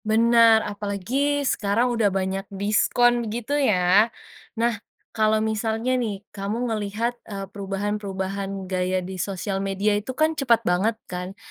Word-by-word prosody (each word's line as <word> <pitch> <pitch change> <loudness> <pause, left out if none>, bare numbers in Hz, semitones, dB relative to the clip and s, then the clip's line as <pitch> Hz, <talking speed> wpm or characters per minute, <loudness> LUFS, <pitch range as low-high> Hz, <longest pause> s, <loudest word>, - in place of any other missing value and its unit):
Benar, 230 0 +5
apalagi 215 +8 -1
sekarang 235 +1 +1
udah 225 -3 +2
banyak 195 +1 -2
diskon 235 +3 +2
gitu 235 +5 -4
ya. 210 -6 +4 0.5
Nah 235 +1 +2 0.4
kalau 215 -1 +3
misalnya 220 +3 -1
nih 215 -5 -2
kamu 200 +2 -3 0.2
ngelihat, 215 +3 -2 0.2
eee, 195 -2 -5
perubahan-perubahan 195 -1 -3
gaya 185 0 -1
di 185 -1 -5
sosial 195 0 -3
media 195 +2 0
itu 215 +6 -3
kan 315 +1 +3
cepet 240 -7 +2
banget 200 +6 +1
kan, 180 +2 -6
210 Hz, 130 wpm, -24 LUFS, 195-230 Hz, 0.5 s, Benar